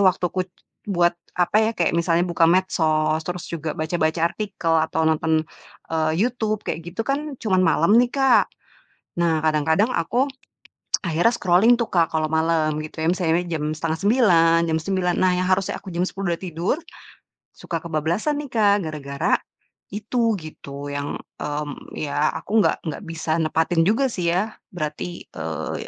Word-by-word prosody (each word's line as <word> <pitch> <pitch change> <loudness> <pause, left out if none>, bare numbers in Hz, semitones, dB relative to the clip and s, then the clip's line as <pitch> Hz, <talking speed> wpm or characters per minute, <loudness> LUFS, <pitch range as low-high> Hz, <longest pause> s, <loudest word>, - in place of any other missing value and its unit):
waktuku 185 -1 +1 0.4
buat 175 -3 +3 0.2
apa 180 +4 +2
ya, 220 - +2
kayak 170 - +1
misalnya 170 +1 +2
buka 170 -2 +3
medsos, 160 -4 +2
terus 180 -1 -4
juga 160 -2 -4
baca-baca 160 0 0
artikel, 175 -2 -2
atau 160 0 +1
nonton, 160 0 +2 0.5
eee, 155 -1 +1
YouTube, 220 -1 -1
kayak 165 - -3
gitu 190 +6 -4
kan, 280 0 -2
cuman 190 -6 +1
malam 165 +2 +3
nih, 245 - +2
Kak. 270 -1 +3 0.7
Nah 165 -2 +2
kadang-kadang 160 - +2
aku 245 - 0 0.7
akhirnya 175 +8 +2
scrolling 195 +5 +4
tuh 235 -2 -3
Kak 165 -3 +2
kalau 155 0 0
malam, 160 -1 +1
gitu 155 +1 -6
ya, 165 - +3
misalnya 175 -1 +1
jam 155 -1 -2
8.30, 165 +1 +3
jam 160 - +1
9.00, 180 0 0
nah 185 -1 +3
yang 185 +1 0
harusnya 190 +1 +1
aku 190 - -8
jam 175 +2 0
10.00 195 -2 -3
sudah 170 - -2
tidur, 170 - -1 0.8
suka 165 -2 -4
kebablasan 170 - -1
nih 275 - -11
Kak, 205 -4 +3
gara-gara 140 -3 -3 0.6
itu, 225 +2 0
gitu, 145 -2 -8
yang, 145 0 -3 0.2
mmm, 145 -1 -5
ya 145 0 0
aku 220 +3 -1
nggak - - +2
nggak 155 - -7
bisa 165 0 -2
nepatin 160 +1 +1
juga 255 +5 +2
sih 175 -5 -1
ya 210 +5 0 0.2
berarti, 155 +2 -4
eee, 80 -1 -4
170 Hz, 155 wpm, -23 LUFS, 160-195 Hz, 0.8 s, scrolling